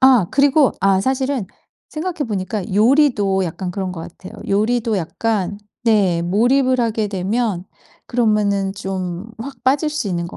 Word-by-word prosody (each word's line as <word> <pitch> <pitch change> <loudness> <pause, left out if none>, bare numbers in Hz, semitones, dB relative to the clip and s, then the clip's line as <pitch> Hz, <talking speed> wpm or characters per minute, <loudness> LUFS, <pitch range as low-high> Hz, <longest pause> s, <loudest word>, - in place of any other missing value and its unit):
아 260 -8 +6
그리고 280 0 +4
아 195 0 +3
사실은 265 -2 -1 0.4
생각해 325 -1 -3
보니까 205 -1 -3
요리도 215 -5 +3
약간 180 +2 -4
그런 185 0 -3
것 165 - -7
같아요. 180 +3 -10 0.2
요리도 220 +2 +1
약간 200 +3 -2 0.3
네 195 -7 +3
몰입을 250 +7 +2
하게 220 -2 0
되면 195 0 -1 0.4
그러면은 210 -4 +1
좀 190 +1 -5
확 270 +5 -8
빠질 280 +4 +2
수 300 -8 -3
있는 170 -2 -2
것 - - -10
210 Hz, 290 characters per minute, -19 LUFS, 190-255 Hz, 0.4 s, 아